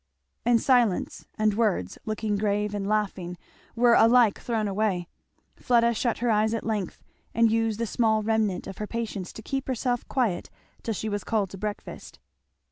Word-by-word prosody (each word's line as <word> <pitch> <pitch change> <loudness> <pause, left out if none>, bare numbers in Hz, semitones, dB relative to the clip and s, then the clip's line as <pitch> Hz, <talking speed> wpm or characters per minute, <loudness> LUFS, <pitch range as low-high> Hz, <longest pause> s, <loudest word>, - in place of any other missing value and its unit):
And 240 -1 +5
silence 240 -7 +1
and 215 -1 +2
words, 205 - 0
looking 215 -1 -1
grave 210 0 0
and 200 -1 -3
laughing, 195 -4 -1 0.4
were 240 0 +5
alike 230 -2 +5
thrown 225 -3 -1
away. 195 -3 -1 0.5
Fleda 235 -1 +3
shut 235 +1 -1
her 240 0 +1
eyes 215 +1 +2
at 230 - -4
length 210 -5 -3 0.3
and 230 -1 +4
used 225 -1 0
the 230 - 0
small 220 -1 +1
remnant 215 -4 0
of 195 - -8
her 210 - -3
patience 220 -5 -4
to 220 - -10
keep 270 +3 -3
herself 245 -1 -1
quiet 230 -10 -1 0.3
till 225 - -3
she 220 - -4
was 205 -2 -2
called 210 -5 -1
to 195 - -8
breakfast. 210 0 -6
220 Hz, 170 wpm, -26 LUFS, 205-230 Hz, 0.5 s, And